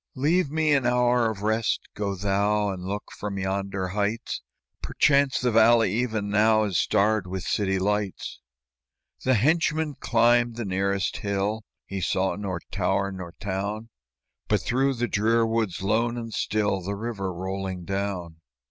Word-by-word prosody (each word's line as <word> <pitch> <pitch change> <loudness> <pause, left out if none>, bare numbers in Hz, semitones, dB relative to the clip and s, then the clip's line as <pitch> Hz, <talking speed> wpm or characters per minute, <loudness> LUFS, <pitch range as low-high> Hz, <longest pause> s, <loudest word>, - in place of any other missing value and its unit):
"Leave 150 +4 +2
me 155 0 +2
an 140 -2 +3
hour 125 -1 +3
of 105 -2 -6
rest; 110 +1 +1
go 100 -1 -2
thou 100 +2 +1
And 90 -2 -6
look 100 +2 -5
from 100 -1 -4
yonder 95 0 -2
heights; 105 +4 -2 0.4
Perchance 140 -1 +2
the 125 -1 +1
valley 115 -2 +5
even 110 -3 -1
now 110 +1 +4
Is 100 -6 0
starred 105 -1 +2
with 95 0 -4
city 95 -2 0
lights." 100 0 -2 0.8
The 130 0 +3
henchman 155 +4 +2
climbed 120 0 +3
the 120 -1 -4
nearest 95 +1 -1
hill, 100 +2 -1 0.2
He 100 -1 -5
saw 95 +2 0
nor 95 -4 -4
tower 100 +1 0
nor 90 -3 -7
town, 100 +3 -3 0.6
But, - - +2
through 135 +2 +1
the 120 0 -1
drear 115 +2 +2
woods, 110 -5 -1
lone 115 +4 +1
and 115 -2 -6
still, 105 -3 0
The 100 +3 -3
river 100 -3 -3
rolling 95 0 -4
down. 95 -4 -3
105 Hz, 150 wpm, -26 LUFS, 95-115 Hz, 0.8 s, valley